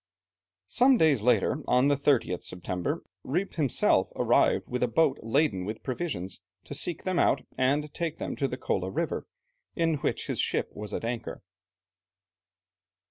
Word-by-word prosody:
Some 255 +1 +4
days 150 - +4
later, 120 +3 +2
on 125 +2 +4
the 145 - +4
30th 135 -10 +1
September, 90 0 -3 0.2
Rijp 180 +8 -2
himself 145 -7 +2
arrived - - +2
with 125 0 -3
a 125 - +3
boat 135 +3 +2
laden 115 -5 +1
with 105 +4 -6
provisions, 120 - -4 0.2
to - - -8
seek 165 +3 -1
them 185 -2 0
out - - +3
and 145 +3 +1
take 165 -2 -3
them - - -4
to 140 - +1
the 125 - -5
Kola 95 -6 -1
River, 95 - -2 0.5
in 165 -2 +1
which - - -2
his - - -3
ship - - 0
was 105 0 -7
at 115 - -3
anchor. 120 -4 -4
130 Hz, 155 wpm, -28 LUFS, 110-155 Hz, 0.5 s, Some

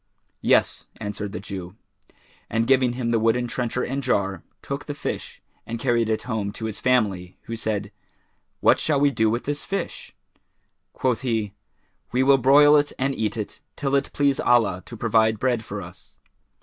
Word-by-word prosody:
"Yes," - - +2
answered 105 -1 -5
the 110 - -5
Jew; 95 -2 -7 0.7
and, 115 +1 +1
giving 130 -1 +3
him 120 -2 -2
the 115 - +2
wooden 115 +2 +2
trencher 120 +1 -2
and 135 +2 -2
jar, 100 -7 0 0.2
took - - -5
the - - -4
fish - - -5 0.2
and 115 - -5
carried 120 -2 +1
it 110 - 0
home 110 -5 -2
to 110 - -5
his 110 -2 -4
family, 100 -8 +1
who 115 - -5
said, 105 -2 -2 0.7
"What - - +5
shall 150 -3 +1
we 145 0 +4
do 110 -4 +2
with 120 +3 -1
this 145 +1 -2
fish?" 195 - -5 0.8
Quoth 125 -3 0
he, 110 -6 -1 0.6
"We 125 +2 +2
will 135 0 +5
broil 145 +3 +7
it 145 0 +1
and 135 +1 0
eat 110 -2 -2
it, 105 - -5
till 135 -1 -2
it 140 0 +1
please 140 -1 +1
Allah 105 -7 +3
to 120 - -9
provide 110 -1 +2
bread 120 0 0
for 100 -2 -6
us." 85 +1 -14
115 Hz, 175 wpm, -24 LUFS, 105-130 Hz, 0.8 s, broil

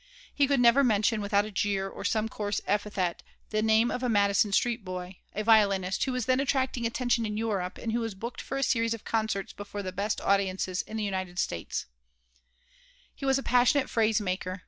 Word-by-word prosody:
He 285 -1 +3
could 280 -1 +2
never 245 +3 +6
mention 215 -2 +2
without 205 0 +2
a 215 - -7
jeer 195 -1 0
or - - -8
some 220 0 0
coarse 205 -2 -3
epithet 200 -4 -1 0.3
the 215 0 +1
name 220 +2 +3
of 250 - -3
a 250 - 0
Madison 205 0 +3
Street 235 +2 +1
boy, 185 0 -6 0.2
a 215 - -1
violinist, 200 -4 +3
who 265 - -2
was 250 -2 -2
then 255 +1 +2
attracting 260 -3 0
attention 240 0 0
in 210 -1 -3
Europe 205 -5 -2
and 230 - -4
who 235 - 0
was 225 -3 -3
booked 235 +5 -6
for 270 - -4
a 275 - 0
series 230 -3 +1
of 225 - -13
concerts 215 -4 -1
before 205 0 -7
the 185 - -4
best 200 +3 -2
audiences 190 -1 0
in 220 - -7
the 215 - -2
United 185 -3 -3
States 85 - -2 1.3
He - - -7
was 270 0 +4
a 270 - -3
passionate 250 +3 +3
phrase 220 -1 +2
maker. 185 -1 -3
215 Hz, 205 wpm, -28 LUFS, 195-235 Hz, 1.3 s, never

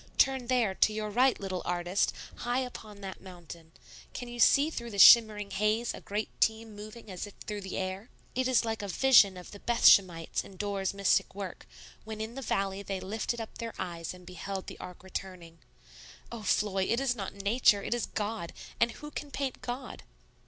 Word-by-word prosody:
Turn 265 -2 +3
there, 240 -6 +2
to 215 - +3
your 215 0 -3
right, 250 +4 +3
little 190 -2 -3
artist, 175 +2 0 0.3
high 245 +2 -1
up 250 - -9
on 210 -2 -13
that 190 -1 -7
mountain; 170 -3 -11 0.4
can 245 - -6
you 240 0 -8
see 285 +6 +5
through 235 -5 -5
the 205 - -7
shimmering 210 -1 +7
haze 215 +3 0
a - - -9
great 210 +2 -5
team 220 -1 +1
moving 215 +1 -10
as 185 +2 -5
if 205 - -14
through 210 -1 -4
the 190 -1 -5
air? 190 +4 -4 0.2
It 255 0 0
is 255 -2 +3
like 225 -1 -2
the 205 - -4
vision 200 -2 +5
of 180 - -10
the 205 - -10
Bethshemites 185 -8 +4
in 195 - -13
Dore's 200 -1 -2
mystic 195 -1 +2
work, 195 -3 -7 0.4
when 220 0 -7
in 220 +2 -4
the 270 - -6
valley 195 -5 -1
they 195 -1 -4
lifted 215 +5 -3
up 225 - -8
their 230 -1 -5
eyes 170 -3 -4
and 180 -1 -12
beheld 190 +2 -6
the - - -9
ark 180 0 -10
returning. 180 -3 -7 0.7
Oh, 235 -1 -6
Floy, 195 -2 +1
it 230 - +1
is 265 -2 +1
not 200 -4 -5
Nature; 200 0 +3
it - - -1
is 240 - -2
God. 210 -4 -4 0.3
And 235 0 +3
who 295 0 -10
can 295 - -6
paint 275 -2 -4
God?" 250 +1 -6
210 Hz, 200 wpm, -30 LUFS, 190-235 Hz, 0.7 s, shimmering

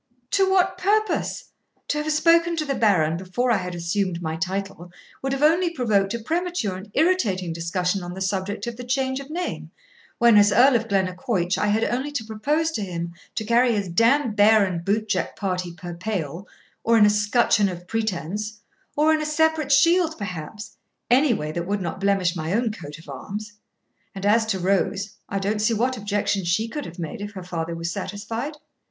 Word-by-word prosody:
'To 385 -1 +3
what 370 -1 +2
purpose? 430 +3 0 0.4
To 300 - 0
have 310 +1 -2
spoke 335 +2 +4
to 310 - -1
the 280 - -1
Baron 180 -10 +2
before 190 +8 -1
I 225 - +4
had 180 -2 -5
assumed 175 +1 -1
my 160 -2 -3
title 190 0 -4 0.3
would 270 - -2
have 275 +1 -1
only 335 +4 +4
provoked 215 -10 +1
a - - -3
premature 330 - -2
and 190 +3 -9
irritating 220 - +1
discussion 180 +3 -1
on 175 0 -6
the - - -7
subject 195 +1 -2
of 235 -1 -5
the 250 - -6
change 260 +1 -1
of 275 +1 -9
name, 350 +3 -4 0.5
when, 235 -2 +6
as 205 0 +6
Earl 250 +5 +6
of 225 -1 0
Glennaquoich, 185 -1 0
I 210 - 0
had 215 +2 +2
only 260 +4 -1
to 250 - -2
propose 290 +10 0
to 225 - -3
him 170 -3 -4 0.2
to 220 - -2
carry 235 +2 +3
his 200 -4 -2
d 175 +7 +2
d 275 +3 +4
bear 210 0 +5
and 175 -3 -3
bootjack 205 -2 -1
party 180 -3 -2
per 175 0 -8
pale, 180 -2 -4 0.4
or 230 0 +4
in 210 - +7
a - - +6
scutcheon 210 0 +3
of 175 -1 -7
pretence, 210 0 -3 0.4
or 310 +2 +4
in 310 - +1
a - - -2
separate 315 -1 +1
shield 330 +3 +4
perhaps 200 +1 -7 0.3
any 270 +3 +5
way 150 -4 -4
that 170 +2 -4
would 205 +1 0
not 180 0 -4
blemish 195 -3 +2
my 160 +1 -2
own 230 +1 +1
coat 150 -8 -9
of 165 - -16
arms. 205 +10 -7 0.6
And 195 0 -5
as 220 +2 +3
to 200 - 0
Rose, 195 +2 0
I 200 - -2
don't 205 +2 -1
see 225 +2 +2
what 250 +4 +1
objection 205 -2 -1
she 175 +6 +1
could 295 +5 -5
have 170 - -11
made 175 +6 -5
if 205 0 -6
her 190 -2 -7
father 170 -2 -4
was 165 +1 -3
satisfied.' 225 - -4
210 Hz, 200 wpm, -24 LUFS, 185-255 Hz, 0.6 s, in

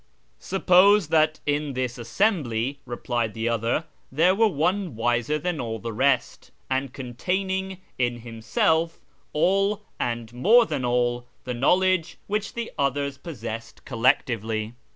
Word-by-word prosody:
" - - -41
Suppose 195 -1 +4
that 155 -1 +3
in 145 -1 -1
this 125 -1 -3
assembly," 135 - 0
replied 120 -2 -2
the 115 +1 -2
other, 115 +7 0
" - - -40
there 165 +7 +4
were 225 +3 +4
one 180 - 0
wiser 120 +5 +1
than 160 +1 -2
all 115 -2 -3
the 115 +1 -6
rest, 130 +2 0 0.2
and 130 0 0
containing 190 +9 -3 0.2
in 120 -1 0
himself 120 +8 0 0.3
all, 195 +6 +1 0.2
xnd 115 -1 -3
more 220 - +5
than 145 -9 -3
all, 120 0 0 0.2
the 125 - -4
knowledge 180 +6 +2
which 210 +1 -3
the 235 -1 -4
others 140 0 -1
possessed 115 -8 -7
collectively. 115 -4 0
140 Hz, 135 wpm, -25 LUFS, 120-180 Hz, 0.3 s, more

